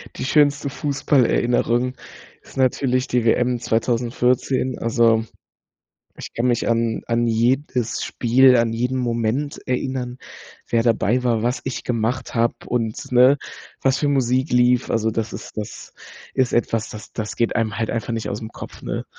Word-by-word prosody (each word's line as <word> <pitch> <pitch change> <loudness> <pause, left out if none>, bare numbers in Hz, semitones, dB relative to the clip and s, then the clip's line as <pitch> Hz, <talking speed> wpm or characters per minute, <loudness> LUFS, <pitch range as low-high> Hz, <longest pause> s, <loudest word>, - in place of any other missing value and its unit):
die - - -5
schönste 145 0 +2
Fußballerinnerung 125 -3 +1 0.5
ist - - -17
natürlich 130 0 +1
die 120 -2 0
WM 125 +1 +2
2014, 125 +3 0
also 115 -1 +2 0.9
ich - - -9
kann 120 +2 0
mich 120 -1 +1
an 115 -1 0
an 120 0 +1
jedes 120 +1 0
Spiel, 125 +2 +4
an 115 -1 +1
jeden 125 +3 -1
Moment 120 +4 -1
erinnern, 125 -1 -2 0.5
wer 115 -1 +2
dabei 115 +1 +2
war, 115 -3 +1
was 120 +2 -1
ich 130 - -4
gemacht 120 +2 -2
habe 115 0 +2
und 115 -2 -3
ne, 130 +3 +6 0.4
was 135 0 +2
für 145 - 0
Musik 130 -2 +1
lief. 125 0 +3
Also, 110 0 +1
das 115 0 -3
ist - - -9
das 105 - -7 0.4
ist 130 -2 +1
etwas, 115 -1 0
das 110 - -10
das 110 -1 -4
geht 115 - 0
einem 110 -3 -1
halt 110 -2 -1
einfach 115 +1 -3
nicht 115 - -3
ausm 110 +2 -5
Kopf, - - -10
ne? - - -4
120 Hz, 155 wpm, -21 LUFS, 115-130 Hz, 0.9 s, ne